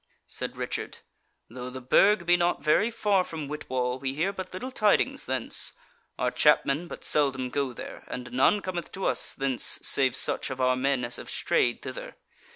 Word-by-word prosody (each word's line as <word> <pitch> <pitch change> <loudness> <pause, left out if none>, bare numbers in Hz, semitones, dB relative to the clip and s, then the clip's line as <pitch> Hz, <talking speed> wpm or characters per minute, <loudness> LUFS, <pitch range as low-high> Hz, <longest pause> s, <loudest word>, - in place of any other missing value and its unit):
Said - - -2
Richard: - - -4 0.5
"Though 125 +2 -7
the 130 +1 -7
Burg 185 +9 +3
be 175 +1 +5
not 175 0 0
very 180 +8 +3
far 205 -4 +1
from 160 -5 -6
Whitwall, 130 -4 -3
we 135 0 -3
hear 180 +7 0
but 190 -1 -7
little 250 +9 -6
tidings 260 +4 +1
thence; 130 -3 +1 0.4
our - - 0
chapmen 150 +6 +3
but - - -9
seldom 130 -4 +1
go 140 -1 -1
there, 120 - -9
and 125 0 -7
none 135 +11 +3
cometh 175 -3 -5
to 195 - -4
us - - 0
thence 135 -2 +1
save 130 -3 +3
such - - +2
of 130 -1 -6
our 130 0 +3
men 130 -1 0
as 120 - -1
have - - -9
strayed - - 0
thither. - - -7
140 Hz, 180 wpm, -27 LUFS, 130-185 Hz, 0.5 s, be